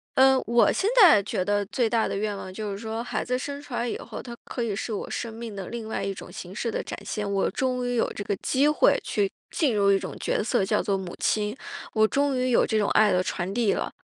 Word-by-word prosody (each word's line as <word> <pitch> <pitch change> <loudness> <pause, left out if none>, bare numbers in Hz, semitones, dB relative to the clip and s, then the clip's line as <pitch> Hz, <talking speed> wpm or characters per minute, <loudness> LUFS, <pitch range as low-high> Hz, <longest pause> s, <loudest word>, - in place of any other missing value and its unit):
呃， 265 0 +6
我 235 +2 +4
现 395 - 0
在 260 - +8
觉 185 - -1
得 205 +1 0
最 235 0 0
大 230 -1 +2
的 - - -3
愿 205 0 -2
望 185 -1 -8
就 210 0 -4
是 195 - -4
说， 225 +2 -4
孩 - - -3
子 250 - 0
生 280 +2 -5
出 290 -3 -11
来 240 0 -1
以 - - -3
后， - - -8
他 240 -1 -8
可 245 - -5
以 220 -4 -1
是 220 +2 -4
我 - - -4
生 230 -2 -4
命 225 -2 -7
的 195 - -5
另 235 -2 -5
外 - - -3
一 195 - -2
种 - - -10
形 180 +1 -8
式 230 - -2
的 - - -2
展 - - -5
现， 205 -1 -3
我 195 - +1
终 255 -1 -1
于 245 - -1
有 230 - +2
这 205 - -5
个 200 - 0
机 270 +9 +1
会 300 - +4
去 200 -2 0 0.2
进 275 -9 +1
入 200 -1 +4
一 195 - +5
种 - - -6
角 - - 0
色 240 -2 +1
叫 210 +2 +1
做 200 - +1
母 185 -2 -5
亲， 210 +3 0 0.4
我 220 -1 +4
终 280 0 +1
于 255 0 +1
有 235 - +5
这 220 - 0
种 205 -2 +2
爱 210 -1 +5
的 180 0 +2
传 185 0 -3
递 230 -4 +2
了， - - -2
220 Hz, 290 characters per minute, -26 LUFS, 200-245 Hz, 0.4 s, 在